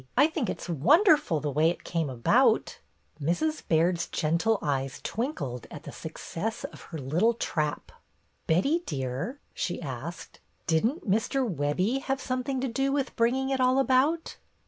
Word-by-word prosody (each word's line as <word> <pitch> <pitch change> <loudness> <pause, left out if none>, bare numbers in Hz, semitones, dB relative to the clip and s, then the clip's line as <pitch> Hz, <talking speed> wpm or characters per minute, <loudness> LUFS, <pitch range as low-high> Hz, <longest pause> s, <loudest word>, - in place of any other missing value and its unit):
I 285 - +7
think 315 -6 -1
it - - -3
's - - -8
wonderful, 290 - +4
the 145 0 -2
way 155 +4 +3
it 175 - -4
came 165 -4 -1
about!" 120 -3 +2 0.4
Mrs. 305 - 0
Baird's 170 +1 +2
gentle 170 +8 +1
eyes 135 -3 -2
twinkled 155 - -3
at 155 -3 -9
the - - -8
success 170 +6 -5
of - - -7
her 165 - -5
little 165 - +1
trap. 150 -9 -2 0.6
''Betty, 275 - +2
dear," 135 - -3
she 175 - -2
asked, 145 +3 -7 0.3
"didn't 220 - +1
Mr. 225 +6 +1
Webbie 185 - 0
have 270 0 -1
something 255 +1 -2
to 265 - 0
do 270 +3 0
with 275 -1 -1
bringing 260 +4 +1
it 265 -1 +1
all 255 +1 +4
about?" 270 +5 +2
200 Hz, 155 wpm, -28 LUFS, -, 0.6 s, I